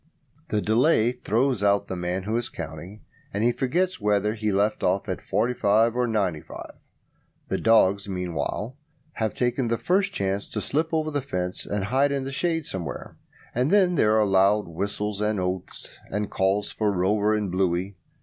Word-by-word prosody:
The 105 -1 0
delay 115 +1 +3
throws 125 0 0
out 100 0 +2
the 95 - -4
man 90 +1 -2
who 110 +3 -2
is 120 0 -1
counting, 85 +5 -8 0.3
and 100 +2 -1
he 120 - +4
forgets 170 +6 -1
whether 105 0 +1
he 110 -1 -1
left 105 +2 +1
off 95 +3 +1
at 95 - -3
45 110 +1 +2
or 125 0 +1
95. 95 -8 -3 0.8
The - - -1
dogs, 100 -3 +3
meanwhile, 90 +6 -3 0.4
have 110 -2 -1
taken 125 0 0
the 115 0 0
first 185 - +1
chance 100 0 -2
to 105 - -3
slip 155 +9 -1
over 155 -1 0
the 145 -1 -1
fence 90 -9 -4
and 100 -1 -2
hide 135 +7 +2
in 140 -1 -1
the 135 - -5
shade 165 +2 -1
somewhere, 85 -6 -5 0.4
and 125 +4 +1
then 190 -2 +4
there 110 -8 +3
are 105 - +4
loud 100 +1 +3
whistlings 100 +4 -3
and 105 -1 0
oaths, 90 0 -4 0.2
and 105 +1 -3
calls 95 +2 0
for 105 -2 0
Rover 100 +3 +2
and 105 -3 -2
Bluey. 95 +1 0
105 Hz, 175 wpm, -25 LUFS, 95-125 Hz, 0.8 s, he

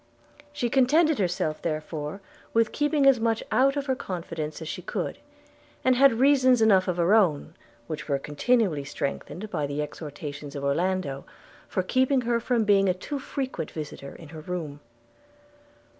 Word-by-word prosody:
She 290 -4 -1
contented 285 +4 +3
herself 175 -4 -1
therefore 155 +2 -4 0.3
with 230 -1 +3
keeping 295 -1 +1
as 270 -3 +6
much 225 0 0
out 275 +2 +3
of 280 - -2
her 265 - +1
confidence 165 -8 -5
as 160 - -7
she 180 - -5
could; 180 - -4 0.7
and 255 0 +5
had 270 0 +6
reasons 255 0 +4
enough 200 -4 +4
of 180 -1 -1
her 175 +3 +3
own, 180 -10 +2 0.3
which 155 +3 -6
were 140 - +2
continually 155 - +1
strengthened 155 +8 -5
by 150 -5 -1
the 145 +1 -4
exhortations 145 -1 -6
of 140 - -5
Orlando, 145 -1 -1 0.4
for 185 - -1
keeping 260 +6 +2
her 235 -1 +1
from 235 -1 +1
being 195 -2 +4
a 180 - +1
too 280 +10 -5
frequent 265 - -4
visitor 145 -3 -7
in 160 - -12
her 160 0 -9
room. 155 -4 -5
185 Hz, 160 wpm, -26 LUFS, 155-250 Hz, 0.7 s, as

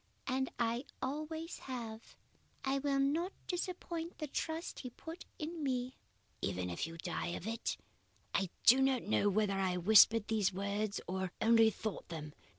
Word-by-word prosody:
And 265 0 0
I 235 +3 0
always 310 +5 -4
have. 230 -4 -6 0.5
I 270 +1 +2
will 280 0 +1
not 320 +7 +1
disappoint 345 -2 -3
the 305 - -3
trust 320 +3 -3
he 255 - -5
put 325 +7 -9
in 320 +1 -4
me.' 255 -2 -1 0.5
"'Even 90 -2 -1
if 85 - -2
you 165 0 -8
die 175 +1 -3
of - - -9
it?' 225 +1 -2 0.6
"I 190 -2 +1 0.2
do 260 +3 +8
not 265 -2 +3
know 110 - +3
whether 205 0 +2
I 185 -2 +1
whispered 215 +3 +7
these 215 -4 +2
words 200 +2 -2
or 190 0 -2
only 225 0 +6
thought 215 -3 -5
them. 155 -3 -6
235 Hz, 155 wpm, -35 LUFS, 195-285 Hz, 0.6 s, do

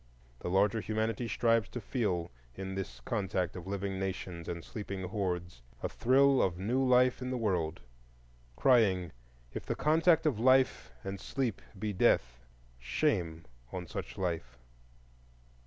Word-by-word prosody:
The - - -4
larger 100 +4 +3
humanity 110 +3 -1
strives 115 -2 +2
to 125 - -5
feel 95 -7 -1 0.2
in 95 0 -5
this 85 -11 -5
contact 95 - -1
of 90 -1 -7
living 100 -1 -2
Nations 90 -3 -4
and 85 -1 -4
sleeping 100 -4 -5
hordes 90 - -3 0.2
a - - 0
thrill 135 +2 +4
of 90 -2 +1
new 120 +8 +1
life 125 0 +4
in 125 - -3
the 130 - -1
world, 90 -8 -1 0.7
crying, 95 - +4 0.4
"If - - -4
the - - -2
contact 160 +1 +4
of 135 -9 +1
Life 130 - +3
and 95 0 -4
Sleep 125 -6 -2 0.2
be 105 +1 -2
Death, - - +2 0.4
shame 80 - 0 0.3
on 90 -1 -4
such - - -6
Life." 80 -10 -3
95 Hz, 140 wpm, -32 LUFS, 90-120 Hz, 0.7 s, thrill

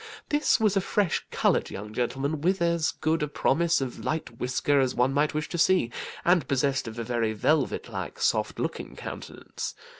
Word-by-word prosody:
This 295 -3 +3
was 215 -3 +3
a 195 - +3
fresh 195 -2 0
coloured - - +1
young 105 +2 -7
gentleman, 135 +5 -1
with 185 +4 +2
as 170 -2 +2
good 160 0 0
a 150 - +1
promise 165 +3 +2
of 130 -2 -4
light 155 -7 -3
whisker 135 +3 +1
as 130 -1 +1
one 125 +2 +2
might 150 +2 +1
wish 155 0 -1
to 175 - -3
see, 175 -9 +3 0.3
and 175 -1 +4
possessed 135 -1 +1
of 110 +1 -7
a 115 - -2
very 115 -1 0
velvet 145 +6 +1
like, - - -6
soft - - +1
looking - - -4
countenance. - - -7
145 Hz, 185 wpm, -27 LUFS, 125-170 Hz, 0.3 s, and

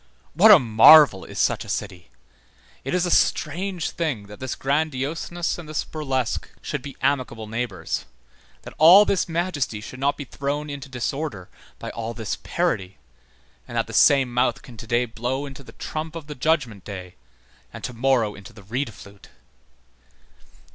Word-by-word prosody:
What 190 +8 +6
a 210 - +11
marvel 120 - +7
is - - -10
such - - +1
a - - -12
city! 90 -4 -5 0.7
it 135 - -2
is 180 -1 +1
a 175 - -1
strange 175 +2 0
thing 145 -12 -3
that 105 0 -12
this 130 -1 -4
grandioseness 155 +5 -2
and 160 -3 -10
this 155 - -2
burlesque 135 -6 -3
should - - -4
be 140 +1 -9
amicable 130 -5 0
neighbors, 110 -6 -4 0.6
that - - -10
all 180 +7 +9
this 190 -3 0
majesty 165 - -2
should 130 +4 -10
not 140 +2 +1
be 145 - -6
thrown 145 +3 -4
into 140 -1 -7
disorder 130 - -4 0.3
by - - -7
all 115 0 -5
this 110 -4 -4
parody, 95 0 -2 0.7
and - - -6
that - - +1
the - - -10
same 135 -4 +4
mouth 125 +4 +1
can 125 -5 -13
to 110 - -9
day 120 +1 +2
blow 125 +4 -3
into 140 0 -9
the - - -14
trump 155 +1 -6
of 165 -3 -7
the 150 - -7
Judgment 125 - -1
Day, 90 -3 -8 0.6
and - - -10
to 125 - -4
morrow 120 -3 +1
into 100 -2 -13
the 100 - -14
reed 120 +5 -3
flute! 100 -1 -15
135 Hz, 170 wpm, -23 LUFS, 115-155 Hz, 0.7 s, a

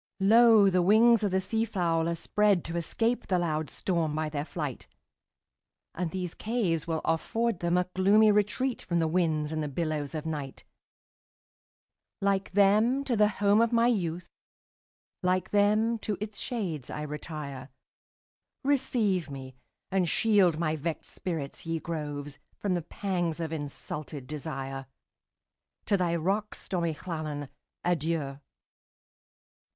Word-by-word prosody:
Lo! 220 +1 +7
the 185 -1 +3
wings 220 +4 +5
of 205 - +2
the 190 0 +1
sea 220 +4 0
fowl 170 -6 0
are 170 - -1
spreadTo 185 -1 +1
escape 225 +8 0
the 185 - +2
loud 155 -4 -1
storm 165 -5 -1
by 155 0 -1
their 145 -1 -3
flight; 150 -5 -5 1.1
And 175 -1 -2
these 180 -1 -4
caves 205 -9 -1
will 160 -1 -1
afford 225 +5 0
them 170 +1 +1
a 180 0 +1
gloomy 210 +3 +5
retreatFrom 210 -2 0
the 165 -1 +2
winds 160 -3 +1
and 155 0 -2
the 150 - -2
billows 150 -1 -2
of 155 0 -4
night; 145 -4 -5 1.6
Like 195 -1 0
them, 215 +7 +4
to 255 -4 0
the 210 -1 +5
home 205 +1 +3
of 230 0 +2
my 230 0 +4
youth, 180 -7 0 0.9
Like 185 0 0
them, 215 +3 +3
to 210 -2 -3
its 210 0 -6
shades 180 - -3
I 150 - -4
retire; 145 -3 -6 0.9
Receive 240 - +1
me, 135 -1 -8 0.4
and 185 -3 +2
shield 195 -7 +3
my 160 -1 0
vexed 160 +1 -4
spirit, 160 -6 -4
ye 165 0 -2
groves, 145 -3 -5 0.2
From 200 -3 -1
the 175 - 0
pangs 175 -1 -2
of 165 -1 -3
insulted 145 -1 -5
desire! 135 -2 -5 1.0
To 205 - +2
thy 175 -3 +1
rocks, 195 +6 -1
stormy 170 -4 -1
Llannon, 150 -4 -5 0.3
adieu! 160 -5 -1
175 Hz, 135 wpm, -29 LUFS, 155-205 Hz, 1.6 s, Lo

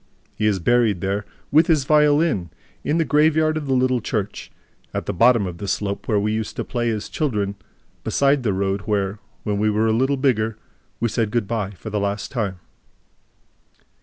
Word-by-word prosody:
He 110 - 0
is 105 -2 +2
buried 110 0 +2
there, 100 +3 -2 0.3
with 155 +3 +5
his 155 -5 +3
violin, 150 - +3 0.3
in 150 +3 +1
the 165 - +2
graveyard 155 +1 +3
of 155 -2 -3
the 135 - +2
little 130 -1 +2
church, 105 -1 -3 0.4
at - - -2
the - - -2
bottom 115 +2 +4
of 85 -2 -6
the 100 - -5
slope 100 +1 -2
where 105 -3 +2
we 105 +1 0
used 110 -1 -3
to - - -2
play 120 -1 -1
as 110 -2 -2
children, 105 -10 -1 0.5
beside 140 0 +2
the 115 -4 0
road 95 +1 -1
where, 100 -1 -1 0.2
when 105 -1 -1
we 110 +1 +2
were 105 +1 +1
a 110 - +2
little 135 +4 +2
bigger, 115 -5 +1 0.4
we 120 - +1
said 115 -1 0
good 115 -2 -1
by 105 -4 -2
for 105 +2 -9
the 105 - 0
last 100 +1 -2
time. 105 -7 -2
110 Hz, 195 wpm, -22 LUFS, 100-135 Hz, 0.5 s, with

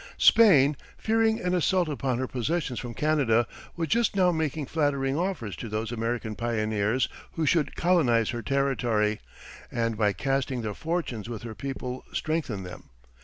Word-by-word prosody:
Spain, 150 -11 +6 0.2
fearing 225 0 +2
an 180 0 -1
assault 180 0 +2
upon 135 -4 -1
her 130 - -1
possessions 130 +1 -2
from 120 -2 -6
Canada, 135 -5 +2 0.3
was 165 -1 -2
just 230 +5 +2
now 185 -2 +4
making 160 -2 -1
flattering 140 -2 0
offers 165 - -2
to 115 - -7
those 110 +1 -3
American 115 -1 -2
pioneers 110 +1 0 0.3
who 160 - -1
should 155 0 +1
colonize 130 - +3
her 120 -1 -4
territory, 120 -6 0 0.5
and 115 -2 -1
by 105 -2 +3
casting 135 0 -1
their 105 -1 -3
fortunes 155 - -3
with 115 -1 -6
her 115 -2 -6
people 130 0 -5
strengthen 155 - -2
them. 90 - -10
130 Hz, 155 wpm, -27 LUFS, 115-160 Hz, 0.5 s, Spain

